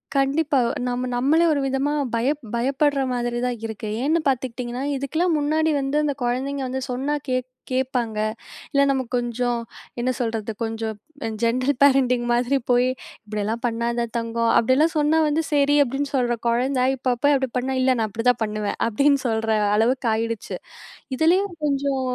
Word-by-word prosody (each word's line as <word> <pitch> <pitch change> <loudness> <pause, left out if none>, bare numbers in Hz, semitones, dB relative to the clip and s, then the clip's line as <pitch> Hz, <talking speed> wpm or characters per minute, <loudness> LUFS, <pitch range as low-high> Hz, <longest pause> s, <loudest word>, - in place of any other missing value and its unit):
கண்டிப்பா. 280 +1 +2 0.3
நம்ம 250 +1 -2
நம்மளே 295 +7 +3
ஒரு 290 - 0
விதமா 270 +2 0 0.2
பய 235 +3 +1 0.3
பயப்படுற 275 +3 +1
மாதிரி 240 -1 -1
தான் 245 -1 -1
இருக்கு. 220 -1 -5 0.2
ஏன்னு 315 +4 +2
பார்த்துக்கிட்டீங்கன்னா, 250 -1 -2
இதுக்கெல்லாம் 315 +6 0
முன்னாடி 315 +2 +1
வந்து 270 +2 -1
அந்த 295 -1 0
குழந்தைங்க 265 +3 -1
வந்து 260 +1 -3
சொன்னா 270 +4 -1
கே 255 -1 +1 0.3
கேட்பாங்க. 250 -4 -1 0.5
இல்லை 280 0 +4
நமக்கு 260 -3 -2
கொஞ்சம் 240 0 -1 0.4
என்ன 250 +2 +1
சொல்றது? 225 -3 -2
கொஞ்சம் 225 -1 -3 0.5
ஜெனரல் 255 +4 +1
பேரண்டிங் 260 -3 +4
மாதிரி 245 +3 +2
போய், 245 0 +4 0.4
"இப்படியெல்லாம் 215 +2 -3
பண்ணாத 235 0 -1
தங்கம்." 230 0 0
அப்படியெல்லாம் 270 +8 +3
சொன்னா 300 +1 +3
வந்து, 300 +2 +1
"சரி!" 290 0 +3
அப்படின்னு 275 +2 -2
சொல்ற 240 -2 +1
குழந்தை, 250 +2 +1
இப்ப 255 -1 0
போய் 290 0 +5
அப்படி 265 -1 0
பண்ணா, 260 +2 -1
"இல்லை. 260 0 +4
நான் 220 - +1
அப்படிதான் 230 +3 +1
பண்ணுவேன்." 210 -1 -3
அப்படின்னு 280 +5 +3
சொல்ற 225 -1 -1 0.3
அளவுக்கு 240 +3 +1
ஆயிடுச்சு. 225 0 -3 0.6
இதுலேயும் 355 +7 +2
கொஞ்சம் 280 -1 0
255 Hz, 150 wpm, -23 LUFS, 235-280 Hz, 0.6 s, போய்